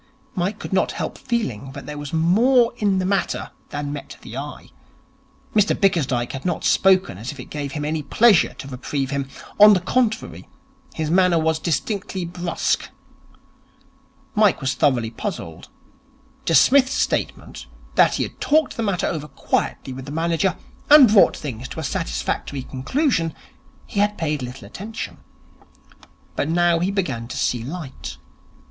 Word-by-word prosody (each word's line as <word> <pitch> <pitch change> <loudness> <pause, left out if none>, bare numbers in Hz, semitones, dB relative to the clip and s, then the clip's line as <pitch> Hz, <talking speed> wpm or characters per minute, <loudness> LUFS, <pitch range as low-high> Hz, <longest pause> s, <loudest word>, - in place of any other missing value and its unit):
Mike 190 +4 -1
could - - -7
not 190 - +2
help - - -4
feeling 140 - -3
that 140 - -8
there 150 - -6
was 145 -1 -6
more 230 +10 +4
in 200 -3 +1
the 185 - 0
matter 195 0 -1 0.2
than 145 0 -4
met 145 - -8
the - - -9
eye. - - -7 0.8
Mr 210 -1 +3
Bickersdyke 140 - +1
had 135 0 -6
not 175 -3 -2
spoken 185 - +3
as 115 +4 -5
if 145 - -12
it 125 - -10
gave 145 -2 -4
him 150 -2 -3
any 155 +1 -1
pleasure 215 +5 +4
to - - -9
reprieve 135 +1 -3
him. 140 -1 -2 0.3
On 210 0 +10
the 190 - +3
contrary, 225 +4 -1 0.5
his 155 -1 -2
manner 180 -1 +4
was 160 0 +1
distinctly 185 +4 -2
brusque. 175 0 -2 1.4
Mike 210 -3 +3
was 135 -1 -1
thoroughly 125 -7 +1
puzzled. 80 -7 -6 0.8
To 165 - +2
Psmith's 265 - +5
statement, - - -2 0.3
that - - +4
he - - 0
had - - -8
talked 310 +1 +2
the - - -1
matter 200 -5 0
over 150 -2 -3
quietly 135 - -2
with 130 0 -8
the 140 - -7
manager 165 +4 0 0.3
and 280 -7 +9
brought 200 - +6
things 130 -3 -6
to - - -7
a - - -4
satisfactory 125 - -3
conclusion, 165 - -1 0.5
he 205 - -4
had 205 0 +2
paid 150 -3 -1
little 125 +2 -7
attention. 220 +3 -7 1.2
But 145 - -1
now 170 0 +3
he 180 +3 0
began 140 - -2
to - - -6
see 120 - 0
light. 150 +1 -7
165 Hz, 160 wpm, -22 LUFS, 140-200 Hz, 1.4 s, On